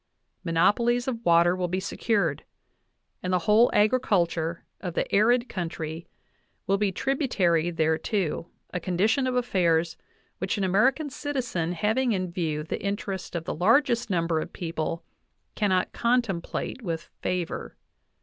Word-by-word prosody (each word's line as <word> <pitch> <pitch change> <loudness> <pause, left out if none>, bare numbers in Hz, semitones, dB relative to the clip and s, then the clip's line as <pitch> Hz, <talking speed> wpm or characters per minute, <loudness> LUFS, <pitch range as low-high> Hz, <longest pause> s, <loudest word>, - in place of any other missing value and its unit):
Monopolies 235 +9 +2
of 235 -3 -3
water 170 0 +5
will 180 -1 -1
be 185 +2 -1
secured, 205 +2 0 0.8
and 185 - -2
the 180 - +4
whole 220 +3 +5
agriculture 175 -7 +1 0.2
of 175 -3 -5
the - - +1
[arid] 240 +4 +4
coun 175 -7 -3
try 160 +1 -6 0.6
will 195 0 +1
be 205 -2 +1
tributary 185 - +1
thereto 165 +2 0 0.3
a 180 - -1
condition 210 +10 +1
of 255 - -1
affairs 170 -9 +1 0.4
which 190 +4 -1
an 200 - -1
American 260 - +2
citizen 245 - -2
having 220 +7 +1
in 185 -3 -2
view 160 -4 -2
the 155 - -4
interests 200 -2 -4
of 170 - -2
the - - -3
largest 235 - +3
number 170 -3 +1
of - - -5
people 165 -1 -4 0.5
cannot 190 -4 +1
contemplate 235 -1 -1
with 165 -6 -3 0.2
favor. 175 - -3
185 Hz, 140 wpm, -26 LUFS, 170-230 Hz, 0.8 s, water